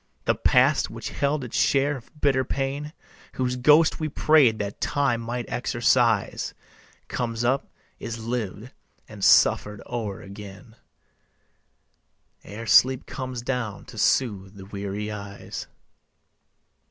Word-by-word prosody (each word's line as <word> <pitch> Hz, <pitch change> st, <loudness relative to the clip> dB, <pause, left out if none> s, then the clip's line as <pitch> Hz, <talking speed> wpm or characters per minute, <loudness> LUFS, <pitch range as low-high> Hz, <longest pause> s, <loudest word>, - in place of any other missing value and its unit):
The -, -, +3 dB
past -, -, +3 dB
which -, -, -6 dB
held 140 Hz, 0 st, 0 dB
its 125 Hz, -, -7 dB
share 140 Hz, +1 st, +2 dB
of 125 Hz, -3 st, -11 dB
bitter 135 Hz, -3 st, +2 dB
pain, 140 Hz, +3 st, -3 dB, 0.4 s
Whose 125 Hz, -1 st, -1 dB
ghost 150 Hz, +6 st, +4 dB
we 155 Hz, -1 st, -2 dB
prayed 140 Hz, -6 st, +4 dB
that 100 Hz, -1 st, -5 dB
Time 135 Hz, -5 st, +1 dB
might 120 Hz, +1 st, -4 dB
exorcise, 120 Hz, -3 st, +1 dB, 0.5 s
Comes 115 Hz, -1 st, -3 dB
up, 130 Hz, +3 st, +1 dB, 0.3 s
is 115 Hz, 0 st, -5 dB
lived 115 Hz, 0 st, -4 dB, 0.3 s
and -, -, -9 dB
suffered 105 Hz, -1 st, +4 dB
o'er 110 Hz, -5 st, -4 dB
again, 100 Hz, +2 st, -11 dB, 1.7 s
Ere 110 Hz, +3 st, -8 dB
sleep 130 Hz, +3 st, +5 dB
comes 130 Hz, -3 st, -6 dB
down 125 Hz, -5 st, -3 dB
to 110 Hz, -, -10 dB
soothe 100 Hz, -5 st, +1 dB
the 95 Hz, -1 st, -10 dB
weary 100 Hz, +1 st, -5 dB
eyes. 100 Hz, -1 st, -7 dB
120 Hz, 120 wpm, -25 LUFS, 105-130 Hz, 1.7 s, sleep